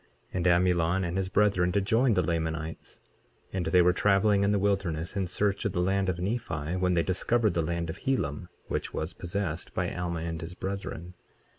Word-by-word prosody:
23:35 - - -35 0.3
And 90 0 +1
Amulon 90 0 +3
and 85 0 -2
his 95 -1 -1
brethren 95 -3 +3
did 95 +2 0
join 115 +2 +3
the 90 - +3
Lamanites, 80 0 -3 0.5
and 95 -2 -1
they 90 -1 +5
were 90 +1 +4
traveling 100 +1 +3
in 100 - +3
the 105 - +3
wilderness 95 -5 0
in 95 -2 0
search 100 +3 0
of 100 -4 -1
the 90 - -1
land 95 +1 +1
of 90 - -1
Nephi 90 -5 -2
when 90 -1 +1
they 85 - +3
discovered 110 +5 +1
the 85 - +1
land 85 +1 -2
of 80 - -6
Helam, 90 - -1 0.2
which - - -3
was 80 +3 -3
possessed 85 -2 -4
by 90 -1 -1
Alma 85 -2 -3
and 80 0 -4
his 85 +2 -7
brethren. 95 -3 -5
90 Hz, 200 wpm, -28 LUFS, 85-100 Hz, 0.5 s, they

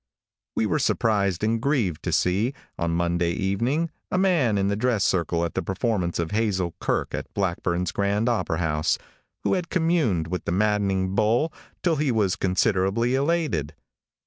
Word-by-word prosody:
|WE 110 - +1
were 155 - +1
surprised 100 - +1
and 110 +1 +1
grieved 115 - 0
to - - -2
see, 105 +9 +1 0.2
on 85 - -1
Monday 85 0 +1
evening, 120 - 0 0.2
a - - 0
man 170 - +3
in 100 0 +1
the 100 - +1
dress 110 -2 +1
circle 85 -2 +1
at 85 - -4
the - - -1
performance 95 -3 -1
of 85 -1 -2
Hazel 100 -6 0
Kirke - - -1
at - - -5
Blackburn's 90 -2 -1
Grand 100 +3 0
Opera 110 -8 0
House, 80 -2 +1 0.5
who - - +1
had 180 -3 -1
communed 160 - +1
with 90 +2 -4
the - - -1
maddening 95 -1 +1
bowl 115 +10 +2 0.3
till 170 -3 +2
he 145 -2 +1
was 105 -5 +1
considerably 95 +5 +1
elated. 135 - 0
100 Hz, 165 wpm, -25 LUFS, 90-125 Hz, 0.5 s, man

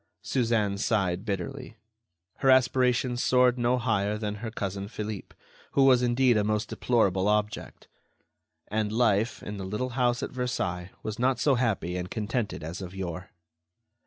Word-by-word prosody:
Suzanne 115 -6 0
sighed 100 -4 0
bitterly. 115 +5 -4 0.6
Her 135 - +2
aspirations 125 -1 +3
soared 125 -1 +3
no 120 +1 +2
higher 105 -4 0
than 105 -1 -3
her 115 - -3
cousin 100 -3 -4
Philippe, 105 -1 -6 0.4
who 140 - +4
was 130 -2 +6
indeed 125 -1 +3
a 105 - +2
most 105 0 -1
deplorable 100 -6 +1
object. 105 0 -1 0.8
And 105 0 -1
life, 110 -1 +1
in 105 - -6
the 95 - -5
little 105 +7 -3
house 120 -1 0
at - - -4
Versailles, 95 -8 -2
was 110 +1 -5
not 130 0 +2
so 145 - +3
happy 110 -8 0
and 90 0 -4
contented 110 -4 -3
as 85 +4 -6
of 95 0 -7
yore. 90 0 -5
110 Hz, 155 wpm, -27 LUFS, 100-125 Hz, 0.8 s, was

